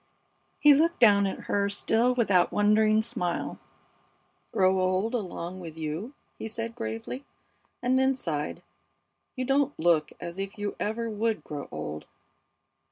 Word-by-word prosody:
'" - - -43
He 295 -1 +8
looked 330 +4 +2
down 200 -4 +6
at 190 - -4
her 200 0 0
still 225 +4 +2
with 235 -3 +2
that 180 -2 +4
wondering 215 +1 +4
smile. 215 -7 -3 0.9
"Grow 190 0 +3
old 185 +5 +1
along 185 -5 -4
with 165 -3 -9
you!" 160 - -4 0.2
he - - -4
said, 230 +1 -5
gravely, 230 +3 -5 0.6
and 255 +1 +3
then 265 0 +3
sighed. 150 - -3 0.7
"You 255 -1 -2
don't 280 +2 +1
look 160 -2 +3
as 170 +2 -7
if 195 +1 -5
you 205 0 -3
ever 225 +2 -2
would 215 -5 -1
grow 145 -2 -6
old." 75 0 -6
210 Hz, 150 wpm, -28 LUFS, 180-235 Hz, 0.9 s, He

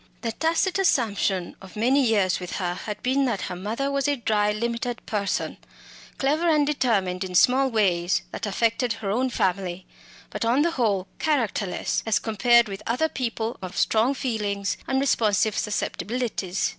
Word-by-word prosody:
The 230 - -2
tacit 335 - 0
assumption 205 - +1
of 190 -1 -13
many 255 +6 +3
years 205 -6 +2
with 180 -1 -6
her 180 -3 -1
had 210 +3 -6
been 270 +2 +2
that 230 -7 -1
her - - -4
mother 225 +9 -2
was 280 0 0
a 290 - +2
dry 210 -4 +1
limited 235 +2 -3
person, 205 -3 -2 0.6
clever 305 +5 +1
and 300 -2 +4
determined 200 -11 0
in 185 -1 -6
small 265 +7 +5
ways, 185 -6 +1
that - - -4
affected 230 +3 +1
her 210 -3 -4
own 255 +5 +1
family, 190 -4 -1 0.5
but - - -3
on 245 +6 +3
the 340 - +1
whole 205 - 0
characterless 230 - 0
as 220 - +3
compared 235 +2 +3
with 195 -1 -6
other 255 +8 +1
people 235 -3 -3
of 185 -1 -7
strong 230 +5 +2
feelings 205 -6 -2
and 265 0 +1
responsive 220 -5 +2
susceptibilities. 210 -2 -2
225 Hz, 160 wpm, -25 LUFS, 200-260 Hz, 0.6 s, small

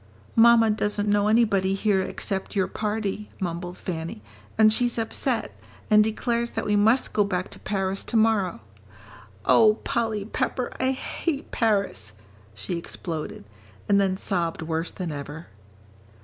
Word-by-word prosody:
"Mamma 230 -1 +6
doesn't 210 -1 -1
know 205 0 +3
anybody 205 -4 +3
here 195 -1 +2
except 195 +1 -4
your 190 -2 +2
party," 210 +1 -3
mumbled 175 0 -4
Fanny, 160 - -5 0.3
"and 215 0 +6
she's 240 +1 0
upset, 225 -1 -1 0.4
and 210 0 +7
declares 235 +2 -1
that - - -1
we 210 - +2
must 220 +5 +3
go 210 - +3
back 185 -2 -2
to - - -11
Paris 195 -1 -2
to 235 - 0
morrow. 215 - +2 0.8
Oh, 215 -1 +6
Polly 220 -3 -1
Pepper, 245 +3 -2
I 260 - +2
hate 275 +3 -3
Paris," 200 - 0 0.4
she 170 - -4
exploded. 165 -2 -6 0.4
And 200 0 +4
then 190 -1 +1
sobbed 170 -5 -2
worse 160 +1 -2
than 180 -4 -5
ever. 145 +3 -7
205 Hz, 140 wpm, -25 LUFS, 180-220 Hz, 0.8 s, and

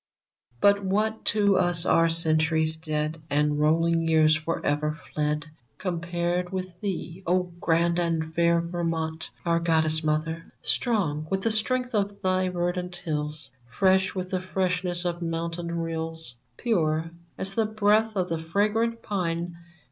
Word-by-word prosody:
But 200 +4 +4
what 215 +3 0
to 205 -2 +3
us 175 -1 +3
are 165 0 +4
Centuries 160 -1 +2
dead, 155 0 -3
And 150 0 +1
rolling 165 +2 +3
Years 155 -1 +5
forever 150 -1 -1
fled, 150 -1 -2 0.3
Compared 175 0 -2
with 185 -2 -5
thee, 190 -2 -4
O 180 0 +1
grand 170 +1 +2
and 165 -2 -1
fair 170 0 +3
Vermont 165 -2 -3
— - - -24
our 170 0 +2
Goddess 160 -1 +2
mother? 160 +2 -1
Strong 165 - 0
with 190 0 0
the 225 - +2
strength 250 +3 0
of 200 -1 0
thy 185 0 +2
verdant 180 0 -2
hills, 150 -4 -4 0.2
Fresh 190 - +2
with 185 0 -4
the 185 -1 0
freshness 180 -1 -1
of 175 0 -2
mountain 170 +1 -3
rills, 165 -4 -4 0.2
Pure 165 -8 0 0.3
as 190 +1 +1
the 220 +1 +1
breath 215 +1 +2
of 185 -2 0
the 165 -1 -1
fragant 215 +7 0
pine. 170 -3 -2
170 Hz, 140 wpm, -26 LUFS, 160-190 Hz, 0.3 s, Years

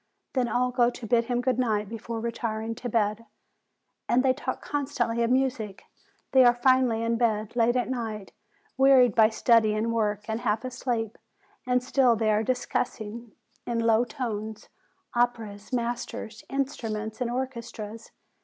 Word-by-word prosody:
Then 255 -2 +1
all 250 +1 +1
go 245 -1 +3
to 245 -1 -8
bid 230 +1 +2
him 245 0 0
good 255 -1 0
night 215 -4 +1
before 225 +1 -5
retiring 230 -1 -3
to 245 +2 -6
bed. 215 0 0 0.8
And 250 +2 +4
they 260 -1 +4
talk 255 -1 -4
constantly 265 -5 -1
of 230 - +2
music. 245 -6 0 0.5
They 260 -1 +7
are 240 -1 +6
finally 245 -2 +3
in 230 0 +1
bed, 220 -2 0
late 240 0 +3
at 250 - +1
night, 225 -5 -4 0.5
wearied 265 -4 +6
by 220 -1 +6
study 220 -1 +3
and 225 +2 0
work, 210 -2 -1
and 220 0 -2
half 225 0 -1
asleep, 240 -3 -3 0.5
and 250 0 +2
still 255 -2 +3
they 220 -1 +1
are 210 0 +2
discussing, 235 -2 -3 0.3
in 235 -1 0
a - - -1
low 225 +1 +4
tone, 220 -4 -4 0.6
operas, 230 -4 -1
masters, 235 -2 -3
instruments, 225 -5 -3
and 245 - 0
orchestras. 235 -3 -5
235 Hz, 155 wpm, -27 LUFS, 220-250 Hz, 0.8 s, They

